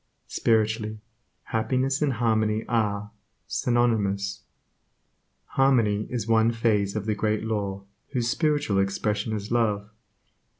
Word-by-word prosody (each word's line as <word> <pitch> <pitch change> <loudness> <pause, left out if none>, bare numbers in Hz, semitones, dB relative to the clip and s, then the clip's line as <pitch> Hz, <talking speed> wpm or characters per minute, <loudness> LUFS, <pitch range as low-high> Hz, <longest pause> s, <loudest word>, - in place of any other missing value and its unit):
Spiritually, 110 -1 0 0.4
happiness 130 +5 0
and 145 -3 +2
harmony 110 -2 +1
are, 105 -3 0 0.3
synonymous. 105 -4 0 1.0
Harmony 115 -7 +2
is 115 -4 -3
one 115 0 +4
phase 110 -3 +1
of 105 -2 -2
the 110 - +1
Great 105 0 0
Law 100 -3 -2 0.2
whose 125 -4 -1
spiritual 145 -7 +1
expression 105 +2 0
is 105 -1 -4
love. 105 -3 +1
110 Hz, 110 wpm, -26 LUFS, 105-120 Hz, 1.0 s, one